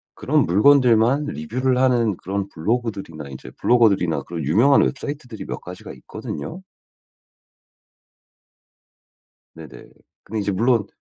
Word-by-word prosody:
그런 - - +1
물건들만 125 - +4
리뷰를 125 - -2
하는 120 -6 +2
그런 100 +1 -4
블로그들이나 95 - -3
이제 65 - -10
블로거들이나 100 -9 +2
그런 85 -3 -6
유명한 115 - +4
웹사이트들이 140 -5 -5
몇 - - -5
가지가 - - -10
있거든요. 165 - -8 2.9
네네. 75 -7 -12 0.3
근데 110 +1 -4
이제 100 0 -1
물론 115 +1 +1
110 Hz, 295 characters per minute, -21 LUFS, 85-125 Hz, 2.9 s, 물건들만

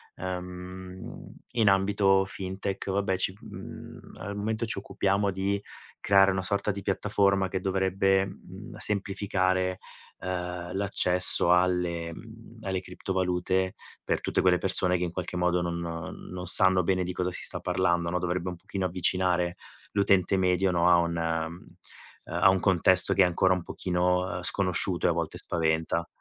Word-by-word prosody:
ehm, 90 0 -8 0.2
in 115 -4 +2
ambito 95 0 +2
Fintech, 95 +1 -5
vabbè 95 -1 -1
ci, 95 0 -1
mhmm, - - -11 0.2
al 100 +1 -6
momento 110 +2 -3
ci 115 - -3
occupiamo 100 0 -1
di 95 +1 -2 0.4
creare 100 0 +4
una 95 0 -2
sorta 100 +2 0
di 100 0 -7
piattaforma 100 0 0
che 95 0 -4
dovrebbe, 95 0 +1
mhmm, 95 +3 -12
semplificare, 95 -3 0 0.4
ehm, 90 -1 -5
l'accesso 90 -3 +5
alle, 90 -2 0
mhmm, 115 +3 -14
alle 95 -2 -3
criptovalute, 95 0 -2 0.3
per - - -1
tutte - - -1
quelle 90 -1 +3
persone 90 -1 +3
che 90 - -3
in 85 - -3
qualche 90 0 -5
modo 90 0 +1
non 85 0 -3
non 85 +2 -7
sanno 95 +1 +8
bene 95 +1 0
di 90 +1 -5
cosa 90 0 -2
si - - -4
sta - - 0
parlando, 85 -2 -1
no, 90 +1 -1
dovrebbe 90 +1 -3
un 90 - -6
pochino 95 +2 -5
avvicinare 90 0 0 0.4
l'utente 100 -2 +2
medio, 95 0 +1
no 85 0 +2
a 90 - +6
un, 85 0 -1
ehm, 80 +1 -4 0.6
a 85 +3 +2
un 95 0 +2
contesto 95 0 +4
che 95 - +4
è - - +4
ancora 90 +1 +2
un 90 -2 -4
pochino, 90 0 -1
ehm, 90 - -5
sconosciuto 90 -1 +2
e - - +3
a - - +1
volte 85 -1 -4
spaventa. 80 0 -1
95 Hz, 160 wpm, -27 LUFS, 90-95 Hz, 0.6 s, sanno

